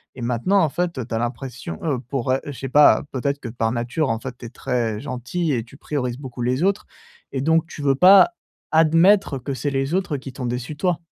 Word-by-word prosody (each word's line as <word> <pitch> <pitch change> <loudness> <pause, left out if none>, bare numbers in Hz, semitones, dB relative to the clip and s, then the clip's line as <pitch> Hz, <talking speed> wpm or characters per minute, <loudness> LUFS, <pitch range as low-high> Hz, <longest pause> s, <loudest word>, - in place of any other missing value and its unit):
et 125 - -9
maintenant 125 - +1
en 160 - +2
fait, 170 +2 -2
heu, 125 - -3
tu 120 - -8
as - - +1
l'impression, 120 -6 -5
heu, 145 -6 0
pour, 130 0 -3
heu, 130 - +2
je 145 - -5
sais 135 0 -6
pas, 145 +3 +6
peut-être 140 +2 -2
que 120 - -6
par 115 -1 -1
nature 125 +5 -1
en 115 - -1
fait 125 0 -7
tu 125 - -10
es - - -7
très 120 -4 -2
gentil 140 +6 -3
et 120 -3 -1
tu 120 - -16
priorises 125 -5 -3
beaucoup 130 -3 -8
les 130 +6 0
autres 195 +1 +1 0.5
et 135 - -1
donc 160 +3 +2
tu 155 - -9
veux 140 -1 +2
pas 190 - +7 0.4
admettre 165 +1 +4
que 135 +2 -5
c'est 135 +3 -2
les 135 +2 -1
autres 185 -5 0
qui 135 -1 -7
t'ont 125 0 -6
déçu 125 +4 -4
toi. 175 +2 0
135 Hz, 235 wpm, -22 LUFS, 125-155 Hz, 0.5 s, pas